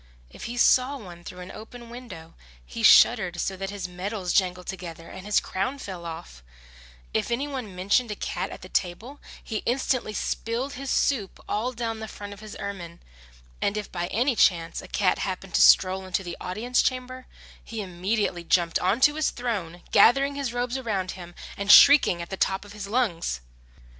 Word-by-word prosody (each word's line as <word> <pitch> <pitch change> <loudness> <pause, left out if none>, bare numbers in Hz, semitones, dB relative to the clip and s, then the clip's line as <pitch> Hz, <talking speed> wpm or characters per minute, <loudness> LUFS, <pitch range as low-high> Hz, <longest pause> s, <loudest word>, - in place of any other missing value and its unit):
If - - -9
he 240 +1 -5
saw 255 +3 +4
one 175 -7 -11
through 180 +1 -9
an 180 - -9
open 235 +2 -11
window 235 -10 -10 0.3
he - - -7
shuddered 175 -1 +6
so 190 - -1
that 195 +1 -5
his 200 -2 -5
medals 180 +1 -4
jangled 180 -2 +1
together 170 -3 -7
and 190 +2 -10
his 210 - +4
crown 195 +9 -3
fell 185 -9 -7
off; 65 - -9 0.7
if - - 0
any 250 +5 -1
one 255 -9 -6
mentioned 205 +6 +1
a 210 - -3
cat - - -3
at - - -10
the - - -8
table 220 +11 -3 0.2
he 220 - -3
instantly 245 -1 -1
spilled 245 +5 -2
his 270 +1 -6
soup 230 -10 0
all 225 +5 -1
down 230 -2 -4
the 220 - -6
front 205 -1 -8
of 200 - -13
his 215 -1 -9
ermine; 180 -4 -6 0.6
and 200 +1 0
if 210 - -5
by 175 -1 -3
any 245 +6 +1
chance 165 -5 +2
a - - -11
cat - - +1
happened - - -4
to 65 - +3
stroll 185 - +5
into 185 +1 -1
the 175 -1 -6
audience 225 +7 0
chamber, 255 0 -3 0.4
he 225 -2 -5
immediately 185 0 -2
jumped 170 -1 +2
on 195 +7 +1
to 295 +2 +6
his 310 - +2
throne, 190 -9 -4
gathering 275 +4 +5
his 280 -3 -3
robes 245 +2 -2
around 195 -7 -2
him 175 -2 -10 0.2
and 200 0 +2
shrieking 275 -12 +8
at 170 - -12
the - - -2
top 190 +2 0
of 205 - -12
his 205 -2 -7
lungs. 200 - 0
205 Hz, 190 wpm, -26 LUFS, 180-245 Hz, 0.7 s, shrieking